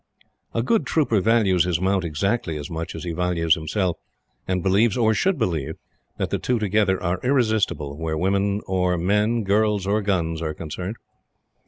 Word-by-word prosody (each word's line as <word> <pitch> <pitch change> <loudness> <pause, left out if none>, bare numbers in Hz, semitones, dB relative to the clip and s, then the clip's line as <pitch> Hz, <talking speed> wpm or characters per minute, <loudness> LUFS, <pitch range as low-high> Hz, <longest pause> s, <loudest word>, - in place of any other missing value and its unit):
A 115 - +1
good 225 - +1
trooper 125 -10 +2
values 105 -5 +3
his 90 -3 0
mount 95 0 +1
exactly 85 +1 -1
as 75 +1 -7
much 80 0 -5
as - - -6
he 85 - -3
values 85 -1 +1
himself, 85 +3 -1 0.5
and 90 -1 -1
believes, 100 +4 +3
or 110 -2 +3
should 190 - +1
believe, 85 - -1 0.4
that - - -2
the - - 0
two 125 - 0
together 105 -2 +1
are 90 0 0
irresistible 110 - +1
where 80 -1 -2
women 100 +3 +1
or 90 -1 +1
men, 105 +6 +1
girl's 105 0 +1
or 105 +2 +1
gun's, 85 -5 -1
are 80 -2 -3
concerned. 90 +6 -5
95 Hz, 170 wpm, -23 LUFS, 85-110 Hz, 0.5 s, values